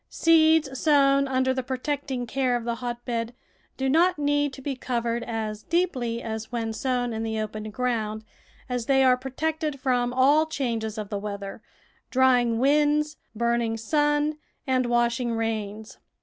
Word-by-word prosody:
Seeds 315 -4 +3
sown 275 -2 +4
under 260 0 +1
the 260 - -1
protecting 260 0 -3
care 255 +1 0
of 240 - -2
the 235 0 -1
hot 240 -1 -5
bed 235 -1 -3 0.4
do 265 - -1
not 340 +6 +3
need 290 -1 +1
to 270 - -9
be 275 -1 -2
covered 235 -2 -2
as 220 -2 -4
deeply 255 -10 -1
as 220 0 -5
when 225 -2 -2
sown 245 +1 -1
in 220 - -3
the 220 -1 -2
open 215 0 -4
ground, 220 -2 -2 0.4
as 245 -2 -3
they 270 -1 +4
are 255 -1 +5
protected 300 +3 -3
from 250 -2 +1
all 285 +5 +4
changes 230 -7 -3
of 210 -2 -5
the 205 - -3
weather, 200 0 -6 0.5
drying 250 -3 +3
winds, 295 +3 +2 0.2
burning 235 0 0
sun, 295 +5 +1 0.3
and 255 -2 +1
washing 240 0 +1
rains. 220 -1 -4
250 Hz, 155 wpm, -25 LUFS, 230-275 Hz, 0.5 s, are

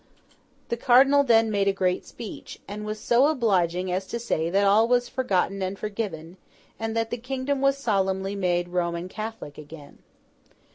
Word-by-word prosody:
The 235 - -1
Cardinal 270 +4 +5
then 225 -4 +3
made 200 -1 +1
a - - +5
great 185 -2 -1
speech, 225 -4 -9
and 210 +1 -6
was 215 0 -4
so 245 +6 +3
obliging 185 - +1
as 185 +1 -2
to 235 - -4
say 170 -9 -1
that 195 +3 +2
all 210 +3 +5
was 245 0 +2
forgotten 195 -6 -1
and 190 +1 -3
forgiven, 195 -6 -5 0.4
and 225 0 -3
that 225 0 -1
the 240 - -2
kingdom 265 +2 -2
was 275 0 +3
solemnly 195 -5 0
made 175 -3 0
Roman 170 0 -2
Catholic 215 -8 -7
again. 150 -1 -12
205 Hz, 170 wpm, -25 LUFS, 185-235 Hz, 0.4 s, Cardinal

